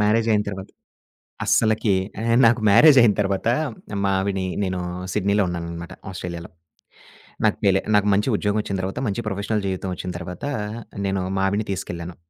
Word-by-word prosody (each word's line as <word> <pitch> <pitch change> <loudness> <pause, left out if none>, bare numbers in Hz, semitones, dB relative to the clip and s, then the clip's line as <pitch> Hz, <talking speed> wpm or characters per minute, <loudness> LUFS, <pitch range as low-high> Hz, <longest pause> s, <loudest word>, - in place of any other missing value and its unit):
Marriage 110 +2 +2
అయిన 105 -1 +3
తర్వాత, 95 -1 -6 0.8
అస్సలకి 110 -2 +2 0.3
ఆహ్, 115 0 +2
నాకు 115 0 +4
మ్యారేజ్ 135 +8 +7
అయిన 115 -3 +5
తర్వాత, 100 +1 -1 0.6
మావిడి 95 0 0 0.2
నేను 95 -1 -2 0.3
సిడ్నీలో 100 0 +2
ఉన్నాననమాట 85 0 -6 0.2
ఆస్ట్రేలియాలో. 90 -2 -6 1.0
నాకు - - +3
పేలే 95 -1 +4
నాకు 105 0 +4
మంచి 105 +5 +1
ఉద్యోగం 105 +1 0
ఒచ్చిన 100 - -3
తర్వాత, 95 +5 -4
మంచి 110 +3 -3
ప్రొఫెషనల్ 100 +1 -2
జీవితం 95 0 -3
ఒచ్చిన 90 - -5
తర్వాత, 90 +7 -7 0.6
నేను 95 -1 -1 0.2
మా 95 - +1
ఆవిడని 100 +2 -1
తీసుకెళ్ళాను. 85 -2 -5
100 Hz, 145 wpm, -23 LUFS, 95-105 Hz, 1.0 s, మ్యారేజ్